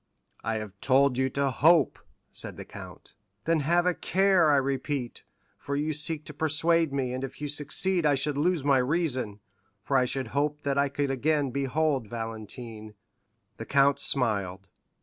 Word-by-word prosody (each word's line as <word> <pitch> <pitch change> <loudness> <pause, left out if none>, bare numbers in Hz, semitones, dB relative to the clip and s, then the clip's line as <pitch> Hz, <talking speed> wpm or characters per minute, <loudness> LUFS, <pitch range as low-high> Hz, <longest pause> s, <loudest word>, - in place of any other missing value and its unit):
"I 115 - -1
have 110 -3 -5
told 130 -1 +3
you 130 0 +2
to 140 +1 0
hope," 155 +3 +4 0.3
said - - -3
the - - -8
count. - - -11 0.3
"Then 165 -1 +2
have 170 +4 +2
a 180 - +3
care, 190 -2 +3
I 145 - +5
repeat, 135 -1 -2 0.4
for 140 - -4
you 150 +2 -1
seek 150 +1 +1
to 150 - -8
persuade 160 +1 +2
me, 130 -3 -2
and 130 +1 -4
if 135 - -7
you 150 - -3
succeed 155 +5 -1
I 145 -2 +3
should 140 +2 -1
lose 160 +1 +1
my 140 -2 +4
reason, 130 -7 -1 0.4
for 135 - -1
I 130 -1 +4
should 130 -1 -3
hope 150 +2 -1
that 140 -1 0
I 140 0 +2
could 140 0 -1
again 145 +1 0
behold 140 -1 0
Valentine." 110 -1 -7 0.6
The - - -7
count 140 0 +3
smiled. 100 -7 0
140 Hz, 170 wpm, -27 LUFS, 125-150 Hz, 0.6 s, I